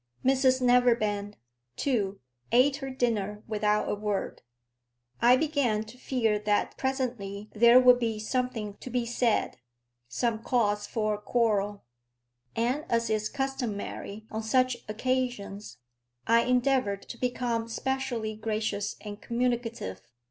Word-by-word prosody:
Mrs 260 Hz, -1 st, +3 dB
Neverbend, 230 Hz, -5 st, +2 dB, 0.4 s
too, 205 Hz, -, -1 dB, 0.3 s
ate 260 Hz, +4 st, +4 dB
her 270 Hz, -2 st, -5 dB
dinner 215 Hz, -5 st, -1 dB
without 210 Hz, -1 st, +1 dB
a -, -, 0 dB
word. 205 Hz, -1 st, -3 dB, 0.8 s
I 245 Hz, +1 st, +7 dB
began 275 Hz, -8 st, +1 dB
to 220 Hz, +3 st, -13 dB
fear 235 Hz, -4 st, 0 dB
that 210 Hz, 0 st, 0 dB
presently 235 Hz, -7 st, -3 dB
there 235 Hz, +3 st, +7 dB
would 250 Hz, -1 st, +6 dB
be 225 Hz, -2 st, -1 dB
something 220 Hz, -2 st, -2 dB
to -, -, -9 dB
be 245 Hz, -1 st, -1 dB
said, 235 Hz, -1 st, 0 dB, 0.5 s
some 220 Hz, -, -1 dB
cause 210 Hz, -4 st, +1 dB
for 215 Hz, -2 st, 0 dB
a -, -, -2 dB
quarrel; 210 Hz, -3 st, 0 dB, 0.7 s
and 250 Hz, +6 st, 0 dB
as 230 Hz, -1 st, +1 dB
is 215 Hz, 0 st, 0 dB
customary 240 Hz, -6 st, -4 dB
on 220 Hz, 0 st, -3 dB
such 255 Hz, +3 st, +2 dB
occasions, 215 Hz, -, -2 dB, 0.5 s
I 230 Hz, +1 st, +4 dB
endeavoured 250 Hz, -5 st, +1 dB
to 235 Hz, -, -10 dB
become 240 Hz, -2 st, -1 dB
specially 245 Hz, -3 st, -2 dB
gracious 215 Hz, -2 st, -2 dB
and 205 Hz, -1 st, -8 dB
communicative. 235 Hz, -, -2 dB
230 Hz, 125 wpm, -28 LUFS, 210-250 Hz, 0.8 s, I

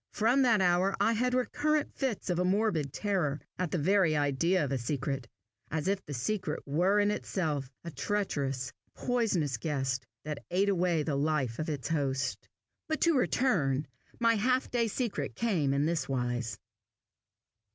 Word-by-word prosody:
From 235 Hz, +5 st, +3 dB
that 230 Hz, -6 st, +4 dB
hour 185 Hz, +2 st, +3 dB
I 230 Hz, -, +3 dB
had 250 Hz, +3 st, +1 dB
recurrent 295 Hz, +4 st, 0 dB
fits 245 Hz, -8 st, -2 dB
of 175 Hz, -, 0 dB
a -, -, +3 dB
morbid 185 Hz, -, +1 dB
terror 175 Hz, -8 st, 0 dB, 0.2 s
at 180 Hz, -2 st, 0 dB
the 180 Hz, -, -1 dB
very 175 Hz, -1 st, +3 dB
idea 145 Hz, +5 st, +2 dB
of 140 Hz, -, -4 dB
a 135 Hz, -, 0 dB
secret 135 Hz, 0 st, -2 dB, 0.4 s
as 160 Hz, +1 st, -2 dB
if 195 Hz, 0 st, +1 dB
a 145 Hz, -, -5 dB
secret 180 Hz, -, -2 dB
were 180 Hz, +8 st, +2 dB
in 205 Hz, 0 st, +3 dB
itself 155 Hz, -10 st, -2 dB
a 170 Hz, -, -6 dB
treacherous, 140 Hz, -10 st, -2 dB, 0.2 s
poisonous 200 Hz, -, 0 dB
guest, 130 Hz, -1 st, -2 dB, 0.2 s
that 150 Hz, -2 st, -5 dB
ate 195 Hz, +3 st, +2 dB
away 175 Hz, -4 st, +2 dB
the 150 Hz, -2 st, -1 dB
life 140 Hz, -5 st, 0 dB
of 155 Hz, -, -2 dB
its 145 Hz, -2 st, -3 dB
host. 135 Hz, -4 st, -1 dB, 0.4 s
But 315 Hz, -1 st, -1 dB
to 335 Hz, -2 st, +4 dB
return, 165 Hz, -, +2 dB, 0.3 s
my 230 Hz, -1 st, +4 dB
half 255 Hz, +5 st, +1 dB
day 235 Hz, -2 st, +2 dB
secret 230 Hz, 0 st, -2 dB
came 180 Hz, -12 st, +1 dB
in 140 Hz, +1 st, +2 dB
this 165 Hz, -2 st, -1 dB
wise. 120 Hz, -4 st, -1 dB
170 Hz, 160 wpm, -30 LUFS, 140-210 Hz, 0.4 s, that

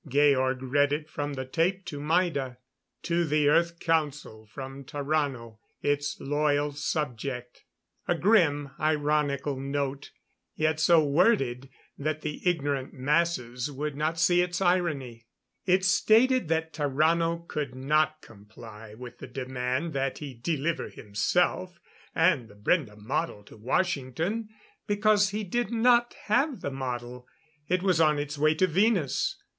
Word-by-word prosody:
Georg 135 Hz, -2 st, +2 dB
read 145 Hz, +2 st, +2 dB
it 150 Hz, +1 st, -2 dB
from 145 Hz, -1 st, -3 dB
the 130 Hz, 0 st, -4 dB
tape 180 Hz, +8 st, 0 dB
to 155 Hz, -4 st, -6 dB
Maida: 150 Hz, -5 st, 0 dB, 0.5 s
"To 170 Hz, 0 st, +1 dB
the 150 Hz, -2 st, +2 dB
Earth 170 Hz, +3 st, +3 dB
Council 150 Hz, -9 st, -1 dB
from 135 Hz, +4 st, -8 dB
Tarrano, 140 Hz, -5 st, -2 dB, 0.2 s
its 145 Hz, 0 st, -1 dB
loyal 145 Hz, 0 st, +1 dB
subject 135 Hz, -4 st, -4 dB, 0.2 s
" -, -, -44 dB
A 175 Hz, -, +2 dB
grimly 160 Hz, -8 st, +3 dB
ironical 145 Hz, -2 st, 0 dB
note, 140 Hz, 0 st, -3 dB, 0.5 s
yet 155 Hz, 0 st, 0 dB
so 160 Hz, 0 st, +5 dB
worded 140 Hz, -, +2 dB, 0.3 s
that 155 Hz, +1 st, -2 dB
the 150 Hz, -1 st, -5 dB
ignorant 145 Hz, -5 st, -2 dB
masses 135 Hz, -3 st, 0 dB
would 145 Hz, +1 st, -4 dB
not 155 Hz, +3 st, -1 dB
see 175 Hz, +1 st, +4 dB
its 180 Hz, 0 st, -1 dB
irony. 150 Hz, -11 st, 0 dB, 0.4 s
It 185 Hz, +1 st, +3 dB
stated 230 Hz, +4 st, +4 dB
that 160 Hz, 0 st, -1 dB
Tarrano 165 Hz, +4 st, +1 dB
could 140 Hz, -4 st, -4 dB
not 155 Hz, +3 st, +1 dB
comply 110 Hz, 0 st, -13 dB
with 125 Hz, +1 st, -10 dB
the -, -, -8 dB
demand 130 Hz, +4 st, -3 dB
that 135 Hz, -1 st, -1 dB
he 145 Hz, -3 st, -7 dB
deliver 155 Hz, +6 st, -2 dB
himself 180 Hz, -, -1 dB, 0.4 s
and 160 Hz, -8 st, +3 dB
the 105 Hz, -, -16 dB
Brende 105 Hz, -, 0 dB
model 110 Hz, +1 st, -3 dB
to -, -, -15 dB
Washington 165 Hz, -, -1 dB, 0.4 s
because 205 Hz, 0 st, +3 dB
he 210 Hz, +1 st, -3 dB
did 240 Hz, +3 st, -1 dB
not 240 Hz, +1 st, +3 dB
have 265 Hz, +5 st, +1 dB
the 140 Hz, -, -3 dB
model. 125 Hz, -2 st, -5 dB, 0.4 s
It 180 Hz, +2 st, 0 dB
was 180 Hz, -4 st, +3 dB
on 155 Hz, -2 st, +4 dB
its 145 Hz, 0 st, -3 dB
way 155 Hz, +2 st, +2 dB
to 185 Hz, -, +3 dB
Venus. 190 Hz, -, +1 dB
150 Hz, 140 wpm, -27 LUFS, 130-170 Hz, 0.5 s, so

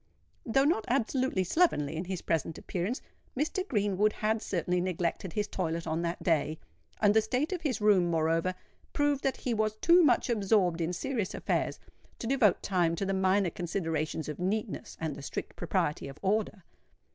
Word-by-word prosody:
Though 270 Hz, +4 st, +3 dB
not 290 Hz, -8 st, +2 dB
absolutely 255 Hz, -4 st, +1 dB
slovenly 175 Hz, -, +2 dB
in 165 Hz, +3 st, -3 dB
his 185 Hz, -1 st, -4 dB
present 165 Hz, -1 st, -1 dB
appearance, 190 Hz, +8 st, -3 dB, 0.3 s
Mr. 355 Hz, +7 st, -1 dB
Greenwood 210 Hz, -, +1 dB
had 220 Hz, +1 st, 0 dB
certainly 180 Hz, -1 st, -1 dB
neglected 180 Hz, 0 st, -2 dB
his 210 Hz, -1 st, -1 dB
toilet 165 Hz, -4 st, -2 dB
on 160 Hz, +1 st, -1 dB
that 170 Hz, 0 st, -3 dB
day; 160 Hz, -2 st, +1 dB, 0.4 s
and 205 Hz, -1 st, +4 dB
the 220 Hz, -, +5 dB
state 255 Hz, -, -1 dB
of 360 Hz, -, -3 dB
his 265 Hz, -8 st, -1 dB
room 205 Hz, -4 st, +4 dB
moreover 165 Hz, +2 st, +1 dB, 0.4 s
proved 290 Hz, -1 st, +1 dB
that 270 Hz, -, 0 dB
he 245 Hz, -, -2 dB
was 215 Hz, -1 st, 0 dB
too 340 Hz, +10 st, +5 dB
much 250 Hz, -6 st, +3 dB
absorbed 195 Hz, -6 st, +2 dB
in 165 Hz, +1 st, 0 dB
serious 210 Hz, +2 st, -2 dB
affairs -, -, -1 dB, 0.4 s
to -, -, -6 dB
devote 230 Hz, -6 st, +3 dB
time 175 Hz, -4 st, +1 dB
to 195 Hz, -, -2 dB
the 195 Hz, -, 0 dB
minor 190 Hz, -1 st, +2 dB
considerations 160 Hz, -3 st, -2 dB
of 150 Hz, -, -5 dB
neatness 205 Hz, +3 st, -3 dB
and 160 Hz, -3 st, -3 dB
the -, -, -9 dB
strict 140 Hz, -, -5 dB
propriety 150 Hz, -1 st, -1 dB
of 135 Hz, +1 st, -9 dB
order. 205 Hz, -1 st, 0 dB
195 Hz, 175 wpm, -30 LUFS, 170-225 Hz, 0.4 s, the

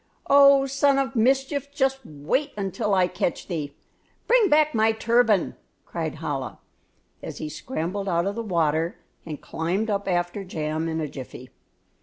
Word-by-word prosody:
"Oh, 275 Hz, -1 st, +6 dB
son 275 Hz, +1 st, +2 dB
of 270 Hz, -1 st, -1 dB
mischief, 270 Hz, +4 st, +1 dB
just 270 Hz, -2 st, 0 dB
wait 225 Hz, -, -2 dB
until 205 Hz, +1 st, -1 dB
I 185 Hz, -1 st, +4 dB
catch 180 Hz, -1 st, -2 dB
thee! 150 Hz, -5 st, -4 dB, 0.5 s
Bring 470 Hz, -4 st, +4 dB
back 305 Hz, 0 st, +4 dB
my 220 Hz, 0 st, +3 dB
turban!" 225 Hz, -3 st, +2 dB, 0.3 s
cried -, -, -4 dB
Chola, -, -, -4 dB, 0.6 s
as -, -, -7 dB
he 155 Hz, -, -5 dB
scrambled 195 Hz, -, -4 dB
out 170 Hz, 0 st, +1 dB
of 200 Hz, -, -1 dB
the 230 Hz, -, -4 dB
water 165 Hz, -5 st, 0 dB, 0.3 s
and 150 Hz, -3 st, -6 dB
climbed 170 Hz, +8 st, -2 dB
up 200 Hz, 0 st, -2 dB
after 175 Hz, +2 st, -1 dB
Jam 160 Hz, -3 st, -3 dB
in 160 Hz, 0 st, -2 dB
a 155 Hz, -, -2 dB
jiffy. 130 Hz, -2 st, -10 dB
200 Hz, 155 wpm, -24 LUFS, 165-270 Hz, 0.6 s, Oh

